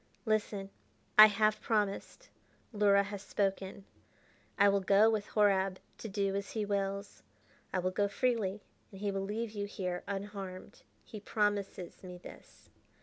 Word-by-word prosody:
"Listen: 210 -3 -1 0.4
I 215 0 +12
have 215 +1 +1
promised; 210 -3 -2 0.4
Luhra 200 -1 +4
has 200 -1 -6
spoken: 195 -1 -2 0.7
I 200 - +6
will 200 0 +4
go 200 +4 +5
with 215 -2 -1
Horab 195 -3 +3 0.2
to 225 - -6
do 195 -1 -1
as 200 0 -4
he 215 -2 -1
wills. 200 0 -3 0.5
I - - -1
will 185 0 0
go 205 +2 +1
freely, 210 -3 -1 0.3
and 195 - -11
he 205 0 -1
will 195 0 -2
leave 215 +3 -3
you 205 -1 -4
here 180 -3 -4
unharmed. 195 -2 -6 0.2
He 215 - -9
promises 205 -3 -2
me 180 -1 -9
this. 175 - -14
200 Hz, 145 wpm, -32 LUFS, 195-210 Hz, 0.7 s, I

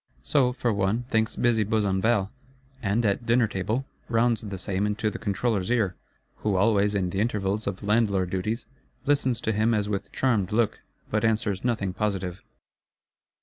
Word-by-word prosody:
So, 130 - +3
for 120 -2 0
one, 100 +4 0
thinks 110 -1 +1
busy 120 -3 +2
Besenval; 105 0 +1 0.5
and, 110 +1 +1
at 105 +4 0
dinner 115 0 +4
table, 105 +7 -2 0.2
rounds 115 -1 +2
the 100 -3 -5
same 95 +2 -1
into 105 +1 -1
the - - -7
Controller's 100 -1 -1
ear,—who 105 -2 -2
always, 100 +1 +3
in 90 -3 0
the 95 - -2
intervals 105 -1 -1
of 100 -1 -3
landlord 100 -4 +2
duties, 105 +6 -2 0.4
listens 130 -4 +2
to 110 - 0
him 110 +2 +2
as 105 -1 0
with 100 -2 -3
charmed 110 -7 +1
look, 110 0 +1 0.3
but 105 0 +1
answers 110 -3 0
nothing 110 -6 0
positive. 95 -3 -2
105 Hz, 155 wpm, -26 LUFS, 100-115 Hz, 0.5 s, dinner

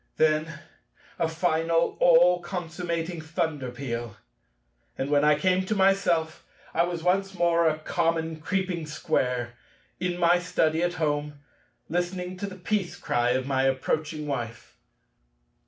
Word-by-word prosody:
Then 155 +1 +2 0.7
a 165 - +2
final, 165 0 +1
all 175 +1 +6
consummating 175 -1 -4
thunder 155 -4 -2
peal; 120 -3 -5 0.8
and, 135 +2 -2
when 145 0 +4
I 150 -1 +5
came 185 +3 +2
to 215 - 0
myself, 190 -5 +2 0.3
I 170 - +3
was 175 -2 -4
once 195 +2 +1
more 170 -1 +3
a 155 -1 +1
common 165 0 -1
creeping 180 -3 -2
Square, 125 -5 -1 0.5
in 180 -1 -1
my 175 0 +4
Study 165 -2 +1
at 175 0 +1
home, 150 -3 -2 0.5
listening 180 +1 -2
to 200 - -4
the 190 - -8
Peace 190 0 -2
Cry 120 +1 0
of 130 0 -1
my 135 -1 +1
approaching 150 +3 -1
Wife. 120 -5 -5
165 Hz, 135 wpm, -26 LUFS, 150-180 Hz, 0.8 s, all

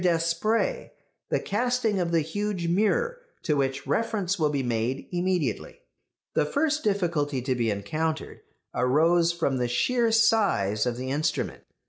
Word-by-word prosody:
Despret 180 - 0 0.4
the - - +1
casting 230 -1 0
of 170 -2 -1
the 165 -1 +3
huge 185 +2 -3
mirror, 220 - +1 0.2
to 150 - +1
which 135 -1 -1
reference 205 -5 -1
will 155 -2 +3
be 140 -2 -1
made 120 +2 -2
immediately. 175 - -1 0.5
The - - +3
first 305 - 0
difficulty 170 -9 0
to 130 0 0
be 120 -2 0
encountered 155 +11 -3 0.3
arose 165 +7 +3
from 165 -6 -1
the 125 -1 0
sheer 230 - +1
size 205 - +3
of 120 -1 -2
the 130 +1 -4
instrument. 150 +3 -2
170 Hz, 140 wpm, -26 LUFS, 135-210 Hz, 0.5 s, the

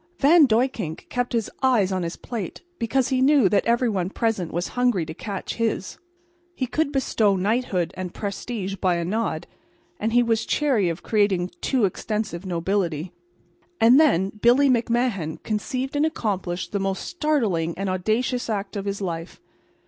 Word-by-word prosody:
Van 300 +1 +6
Duyckink 225 - -1
kept 245 0 -1
his 230 -3 0
eyes 240 -8 +3
on 185 -1 -1
his 170 0 -3
plate 220 -8 -6 0.2
because 250 +2 +1
he 260 -1 +1
knew 275 -5 +5
that 200 +1 +2
every 235 +2 +3
one 190 -5 -1
present 210 -6 -1
was 175 +2 -2
hungry 245 -9 +1
to 160 - -7
catch 195 +2 -5
his. 225 -4 -2 0.6
He 260 - -1
could 285 +4 -1
bestow 225 -7 +2
knighthood 195 -2 0
and 185 -1 -5
prestige 200 0 -4
by 185 -2 +1
a 170 0 -2
nod, 185 -4 -2 0.5
and 220 +2 -1
he 245 +1 +4
was 225 -1 +1
chary 255 -12 +2
of 165 +1 -5
creating 205 -4 +2
a - - -2 0.2
too 255 -6 +2
extensive 200 -1 -3
nobility. 175 -2 -1 0.7
And 240 +5 +7
then 195 - +4
Billy 245 +6 +4
McMahan 230 -9 0
conceived 255 +6 -3
and 295 +2 +3
accomplished 190 - -3
the 200 - -1
most 195 0 -2
startling 225 - 0
and 195 +1 -2
audacious 220 +7 -1
act 205 -1 -3
of 200 -1 -3
his 200 0 -3
life. 170 -2 -5
210 Hz, 165 wpm, -24 LUFS, 185-245 Hz, 0.7 s, And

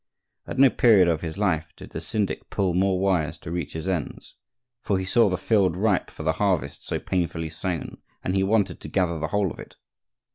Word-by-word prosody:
At - - -5
no 135 -1 +7
period 110 -8 +5
of 80 -2 +1
his 80 +1 -5
life 85 -6 0
did - - -11
the - - -5
syndic 105 -3 -2
pull 95 -3 0
more 95 +1 +2
wires 90 -6 +1
to 80 - -8
reach 85 -4 -3
his 80 +3 -5
ends, 90 -5 -4 0.5
for 100 - 0
he 95 - -2
saw 115 +2 +4
the 90 - -1
field 95 -6 +2
ripe 100 -2 +1
for - - -9
the - - +2
harvest 90 -8 0
so - - -2
painfully 80 -3 -2
sown, 85 +1 -4 0.2
and 90 - -1
he 95 - +3
wanted 100 -2 +1
to - - -7
gather 85 -4 0
the 80 - -2
whole 100 -4 0
of - - -10
it. - - -11
95 Hz, 215 wpm, -25 LUFS, 85-100 Hz, 0.5 s, no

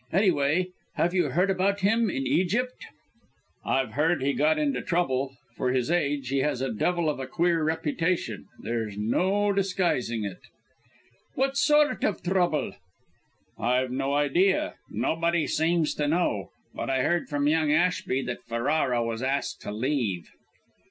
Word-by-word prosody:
Anyway, 180 -2 +2 0.3
have 175 +1 +1
you 180 -3 +2
heard 180 +8 +2
about 195 +2 +1
him, 220 +3 +3
in 135 -6 -2
Egypt?" 220 - 0 0.8
"I've 130 -4 0
heard 155 +2 +1
he 140 +1 +1
got 155 +2 +2
into 140 -4 0
trouble. 135 -6 -1 0.2
For 125 - 0
his 130 +4 0
age, 145 -6 0
he 135 +1 +1
has 140 -2 0
a 130 -2 -2
devil 170 +9 0
of 150 - -1
a 130 - -4
queer 170 +3 +1
reputation; 165 +2 -1 0.2
there's 110 -3 -3
no 190 - +1
disguising 180 - 0
it." 95 -3 -6 1.0
"What 270 +1 0
sort 295 +1 +3
of 205 - 0
trouble?" 175 -5 +1 0.9
"I've 125 +1 +1
no 135 +2 -1
idea. 170 +7 +2 0.2
Nobody 170 0 0
seems 160 0 +1
to 150 - -1
know. 145 - 0 0.2
But - - -4
I 130 -1 +1
heard 175 -1 0
from 145 -1 0
young 155 -1 +2
Ashby 155 -5 +1
that 120 - -5
Ferrara 120 +1 +1
was 115 0 -3
asked 135 +2 -2
to - - -5
leave." 110 - -2
150 Hz, 150 wpm, -27 LUFS, 130-180 Hz, 1.0 s, him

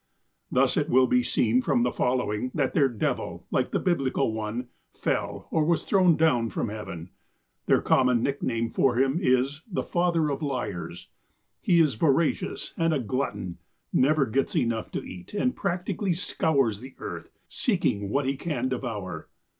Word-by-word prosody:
Thus - - +3
it - - +1
will 130 +1 +5
be 125 0 +3
seen 120 0 +2
from 125 -2 +1
the 125 - +1
following, 125 -2 0
that 140 -4 0
their 140 -4 +4
devil, 115 -4 -3
like - - +1
the - - 0
Biblical 135 -8 0
one, 110 +3 -4 0.2
fell, - - -2
or 160 - +2
was 170 +2 +1
thrown, 185 -4 +4
down 125 -8 +3
from 110 - -2
heaven. 95 -5 -7 0.6
Their - - +3
common 125 -3 +3
nickname 120 -4 -1
for 130 -3 +2
him 135 +5 +2
is 135 0 +1
the - - -1
''father 170 -4 +1
of 140 - -5
liars." 120 - -4 0.5
He 175 -2 +3
is 155 -5 +4
voracious, 150 +6 0
and 165 -1 +2
a - - 0
glutton, 105 -7 -3 0.3
never 140 +2 +3
gets 135 - -1
enough 115 -7 0
to - - -3
eat, 90 - -10
and 255 +4 +1
practically 185 +1 -1
scours 135 - +1
the 130 +2 -11
earth, - - -7 0.2
''seeking 100 -1 0
what 140 +5 0
he 135 +1 0
can 135 -4 -2
devour." 105 - -4
130 Hz, 160 wpm, -26 LUFS, 115-155 Hz, 0.6 s, will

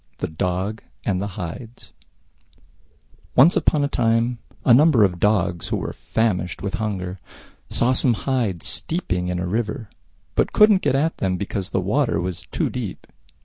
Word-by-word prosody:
THE - - -3
DOGS 90 +6 -3 0.2
AND 95 -2 0
THE 100 - -2
HIDES 110 +8 -8 1.4
Once 145 +8 +6
upon 150 -2 +2
a - - +2
time 115 -2 +1 0.3
a 120 - +6
number 140 -3 +6
of 90 -3 +1
Dogs, 90 -5 +1
who - - -1
were - - -4
famished 100 -6 -1
with 100 0 -3
hunger, 95 -3 -3 0.5
saw 125 +2 +3
some 125 -2 +2
Hides 115 -10 -1
steeping 90 - 0
in 90 0 -2
a 90 - -2
river, 110 +2 -3 0.4
but - - 0
couldn't 210 -3 +6
get 140 -2 +1
at 155 +4 0
them 95 -1 -1
because 95 -1 -4
the - - 0
water 115 +7 +1
was 90 0 -5
too - - -1
deep. - - -5
105 Hz, 160 wpm, -22 LUFS, 90-125 Hz, 1.4 s, Once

